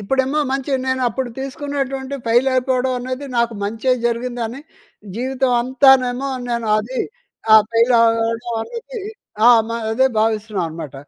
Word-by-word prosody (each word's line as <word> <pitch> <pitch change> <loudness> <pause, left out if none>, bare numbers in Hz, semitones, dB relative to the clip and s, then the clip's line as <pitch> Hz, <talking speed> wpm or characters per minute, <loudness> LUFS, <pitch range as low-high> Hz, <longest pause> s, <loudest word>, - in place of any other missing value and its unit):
ఇప్పుడేమో 265 +7 0
మంచి 270 +1 -3 0.2
నేను 260 0 0
అప్పుడు 250 +2 -3
తీసుకున్నటువంటి 275 -1 -4
ఫెయిల్ 240 +4 +3
అయిపోవడం 255 0 +1
అనేది, 255 +3 -5
నాకు 235 -1 +1
మంచే 225 +5 0
జరిగింది 240 0 -2
అని 255 +5 -8 0.6
జీవితం 260 +1 0
అంతానేమో 260 0 +3 0.2
నేను 235 -2 -2
అది 245 +4 -4 0.6
ఆహ్, 215 - +7
ఫెయిల్ 230 +2 +3
అవ్వడం 230 +1 0
అనేది, 475 0 -8 0.5
ఆ! - - +9 0.2
మ - - -7 0.2
అదే 260 +3 +3
భావిస్తున్నాను 215 -3 -1
అన్నమాట. 155 -3 -8
250 Hz, 135 wpm, -19 LUFS, 230-265 Hz, 0.6 s, ఆ